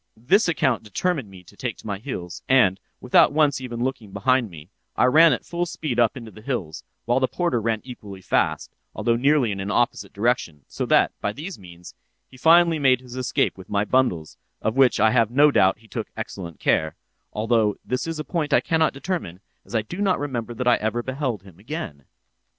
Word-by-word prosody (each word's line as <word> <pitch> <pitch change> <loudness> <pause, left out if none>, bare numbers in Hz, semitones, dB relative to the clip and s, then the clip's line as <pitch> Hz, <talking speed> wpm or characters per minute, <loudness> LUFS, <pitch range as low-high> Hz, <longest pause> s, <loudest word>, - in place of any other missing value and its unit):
"This 180 - +3
account 140 -7 +1
determined 130 - -2
me 95 -2 -14
to - - -18
take - - -4
to - - -16
my 100 -3 -4
heels, 95 -7 -6
and, 100 -8 +4 0.2
without 125 +3 +4
once 150 -3 +2
even 120 -2 -4
looking 125 -6 -4
behind 125 +3 +1
me, 80 +1 -13 0.2
I - - +3
ran 160 +6 +6
at - - -2
full 175 0 -2
speed 150 -7 -3
up 120 +1 +2
into 115 -3 -9
the 110 - -14
hills, 105 - -4 0.2
while 120 +2 +2
the 130 - +2
porter 170 -9 -1
ran 110 -1 -1
equally 105 -6 -10
fast, - - 0 0.2
although 115 - +1
nearly 135 -1 +2
in 100 - -4
an 95 +1 -4
opposite 120 +3 0
direction, 100 - -1
so - - -4
that, - - +4
by 100 - -1
these 165 - -7
means, 90 -2 -13 0.3
he - - -18
finally 165 +3 +5
made 130 -3 +3
his 125 -1 -11
escape 125 -6 -1
with 95 - -12
my 100 0 0
bundles, 100 -11 0 0.2
of 110 - -2
which 135 -3 +4
I 110 +1 +4
have 115 -3 +3
no 145 +4 +5
doubt 95 -7 +3
he 110 +1 -21
took - - -5
excellent 85 -4 -7
care—although 105 +7 -1
this 125 +4 -2
is 165 -1 -3
a 155 - -3
point 150 +1 -2
I - - +6
cannot 160 -2 +1
determine, 135 - -4 0.2
as 100 - -9
I 110 - +1
do 175 - -7
not 195 -3 +2
remember 120 -5 -4
that 125 +1 -3
I 120 - +5
ever 110 +2 -2
beheld 130 -6 -3
him 95 -3 -16
again. 105 - -7
120 Hz, 205 wpm, -23 LUFS, 100-140 Hz, 0.3 s, ran